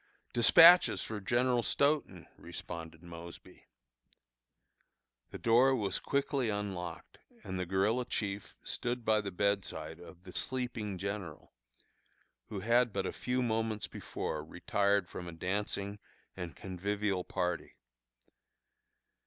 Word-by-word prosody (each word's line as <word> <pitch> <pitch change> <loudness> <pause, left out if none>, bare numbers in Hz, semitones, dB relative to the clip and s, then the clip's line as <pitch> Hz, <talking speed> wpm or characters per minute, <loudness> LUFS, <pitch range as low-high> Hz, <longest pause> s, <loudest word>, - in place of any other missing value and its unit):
"Despatches 165 +9 +8
for 110 -1 -4
General 120 +4 +2
Stoughton," 140 - +1
responded 85 -1 -8
Mosby. 85 0 -11 1.6
The - - -7
door 125 +4 +5
was 100 -6 0
quickly 140 -3 0
unlocked, 100 -4 -5 0.2
and 95 0 -4
the 90 - -2
guerilla 105 +7 +1
chief 100 -3 -3
stood 120 -1 -2
by 110 -1 +4
the 100 - -4
bedside 90 -5 -1
of 90 0 -13
the 90 -1 -11
sleeping 120 -6 -2
general, 95 -4 -5 0.9
who 100 -3 -5
had 120 +3 +3
but - - -2
a - - -2
few 125 0 -1
moments 110 -2 -1
before 75 - -4
retired 100 +4 +1
from 90 - -7
a - - -5
dancing 100 +3 -3 0.4
and 90 -3 -6
convivial 100 0 -2
party. 90 -4 -2
100 Hz, 115 wpm, -33 LUFS, 90-115 Hz, 1.6 s, Despatches